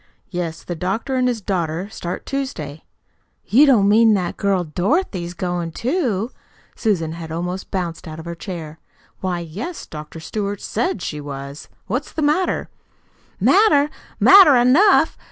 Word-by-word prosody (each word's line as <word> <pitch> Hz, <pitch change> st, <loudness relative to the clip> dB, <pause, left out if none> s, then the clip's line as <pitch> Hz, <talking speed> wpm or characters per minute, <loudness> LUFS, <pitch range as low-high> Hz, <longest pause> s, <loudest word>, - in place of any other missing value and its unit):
"Yes. 170 Hz, -3 st, -4 dB
The 175 Hz, -, -4 dB
doctor 195 Hz, -, -2 dB
and 255 Hz, -1 st, +2 dB
his 240 Hz, -3 st, -1 dB
daughter 180 Hz, -2 st, -2 dB
start 175 Hz, -4 st, -5 dB
Tuesday." 160 Hz, -, -5 dB, 0.6 s
"You 280 Hz, +7 st, +5 dB
don't 220 Hz, -8 st, +5 dB
mean 220 Hz, +1 st, +5 dB
that 180 Hz, -3 st, -2 dB
girl 195 Hz, -3 st, +1 dB
Dorothy's 180 Hz, -, -1 dB
goin' 175 Hz, -1 st, -3 dB
too?" 240 Hz, -, -1 dB, 0.4 s
Susan 175 Hz, -8 st, 0 dB
had 165 Hz, -1 st, -7 dB
almost 180 Hz, +3 st, -4 dB
bounced 175 Hz, -4 st, -4 dB
out 155 Hz, 0 st, -7 dB
of 160 Hz, -, -9 dB
her 170 Hz, -, -4 dB
chair. 165 Hz, -3 st, -7 dB, 0.4 s
"Why, 185 Hz, -2 st, -2 dB
yes, 205 Hz, -, -6 dB
Dr. 155 Hz, +1 st, -9 dB
Stewart 200 Hz, +4 st, -4 dB
SAID 220 Hz, -4 st, -2 dB
she 150 Hz, -1 st, -4 dB
was. 140 Hz, 0 st, -8 dB, 0.2 s
What's 255 Hz, +8 st, -3 dB
the 315 Hz, -, -2 dB
matter?" 310 Hz, +6 st, +1 dB, 0.7 s
"Matter? 300 Hz, -9 st, +4 dB, 0.3 s
Matter 380 Hz, -8 st, +8 dB
enough! 270 Hz, +12 st, +4 dB
190 Hz, 145 wpm, -20 LUFS, 165-250 Hz, 0.7 s, Matter